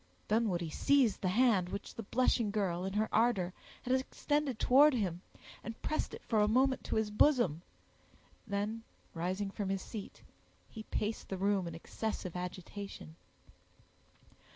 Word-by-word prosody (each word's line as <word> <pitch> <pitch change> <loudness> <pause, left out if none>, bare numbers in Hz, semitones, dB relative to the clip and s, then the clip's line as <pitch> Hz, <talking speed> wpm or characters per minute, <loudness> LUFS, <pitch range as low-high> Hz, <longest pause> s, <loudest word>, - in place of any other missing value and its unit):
Dunwoodie 195 -7 +1
seized 265 - +3
the 185 - 0
hand 200 -3 +3
which 200 +2 -6
the - - -6
blushing 230 0 +1
girl, 190 -4 -1
in 190 - -3
her 215 +1 +1
ardor, 215 -6 +2 0.3
had 255 - 0
extended 270 0 0
towards 275 +4 +6
him, 180 -5 -2 0.4
and 225 0 -7
pressed 310 - -1
it - - -13
for 220 -3 +2
a 210 - +4
moment 260 +4 +2
to - - -2
his 220 -1 0
bosom; 210 - +3 0.9
then 205 +3 -2 0.3
rising 185 +4 -2
from 200 -1 -3
his 195 -1 -1
seat, 210 -3 -8 0.5
he 220 - -7
paced 215 0 -3
the 190 - -3
room 195 -1 +1
in 165 - -6
excessive 185 +1 -4
agitation. 180 - -7
210 Hz, 150 wpm, -33 LUFS, 185-235 Hz, 0.9 s, towards